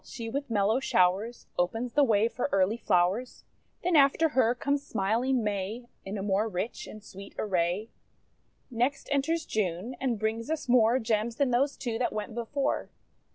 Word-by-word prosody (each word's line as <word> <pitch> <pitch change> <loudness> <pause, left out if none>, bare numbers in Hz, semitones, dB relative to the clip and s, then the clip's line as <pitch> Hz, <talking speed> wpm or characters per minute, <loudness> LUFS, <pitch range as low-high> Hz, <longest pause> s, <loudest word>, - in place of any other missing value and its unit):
she 230 -2 -7
with 280 +4 -3
mellow 215 +2 +2
showers 200 0 +1
Opens 225 +7 -1
the 295 - +5
way 220 -4 +3
for 245 +4 -3
early 195 +2 +2
flowers. 195 +4 0 0.4
Then 355 -1 +2
after 290 +3 +5
her 250 -4 +2
conies 280 +3 0
smiling 235 +1 0
May, 210 +4 -3 0.2
In 195 +2 -4
a 195 - -4
more 205 +2 +1
rich 200 +4 -4
and 215 -1 -10
sweet 195 -1 -11
array. 185 +2 -1 0.8
Next 245 +4 -1
enters 320 +4 +1
June, 205 +3 -2
and 250 -4 0
brings 220 +4 -2
us 320 -3 -2
more 240 -1 +5
Gems 225 -1 -1
than 270 0 +1
those 275 +4 +1
two 235 -3 -3
that 250 - 0
went 215 +1 -4
before. 240 +5 -2
230 Hz, 165 wpm, -28 LUFS, 205-255 Hz, 0.8 s, the